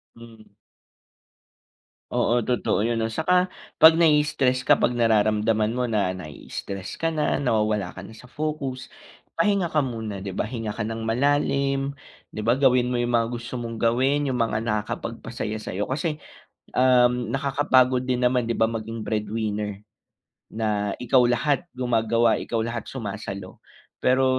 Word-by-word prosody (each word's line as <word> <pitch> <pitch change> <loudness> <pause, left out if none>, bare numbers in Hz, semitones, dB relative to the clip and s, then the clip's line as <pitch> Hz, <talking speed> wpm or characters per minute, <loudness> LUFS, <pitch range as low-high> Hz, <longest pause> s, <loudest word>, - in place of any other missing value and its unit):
Hmm. 115 -2 -15 1.6
Oo. 120 -1 +1
Totoo 120 -3 0
yun 115 -1 0
'no. 110 - 0
Saka 180 +8 +2 0.3
'pag 160 0 +9
nai-stress 150 -5 +3
ka, - - +4
'pag 120 - +1
nararamdaman 110 -1 +2
mo 125 -1 -1
na 100 -4 +1
nai-stress 95 +3 -7
ka 165 - +2
na, 155 -3 0
nawawala 105 -7 0
ka 95 - -7
na 110 - -12
sa 125 +3 -15
focus, 140 -4 -4 0.4
pahinga 200 -3 +2
ka 150 - +4
muna, 110 -6 -4
di 100 - -5
ba? 95 - -2
Hinga 115 -1 -4
ka - - -2
ng 115 +1 -4
malalim, 140 +3 0 0.3
di 105 - -6
ba? 115 - +4
Gawin 125 -2 +3
mo 120 - +1
yung 120 - -1
mga 115 -1 +2
gusto 120 +1 -5
mong 115 -2 -6
gawin, 135 +5 +2
yung 125 - -1
mga 110 -1 0
nakakapagpasaya 110 0 -3
sa'yo. 100 -1 -4
Kasi, 150 +3 -1 0.6
um, 125 -2 +4
nakakapagod 130 -2 +2
din 125 -1 0
naman 125 -1 +2
di 115 - -1
ba, 110 0 +2
maging 115 0 -5
breadwinner. 105 -1 -3 0.7
Na 105 -2 -1
ikaw 125 +1 +4
lahat 140 +7 +1
gumagawa, 115 -2 +2
ikaw 115 - -3
lahat 115 -1 -3
sumasalo. 100 -5 -7 0.4
Pero 130 +1 +4
120 Hz, 150 wpm, -24 LUFS, 110-130 Hz, 1.6 s, pag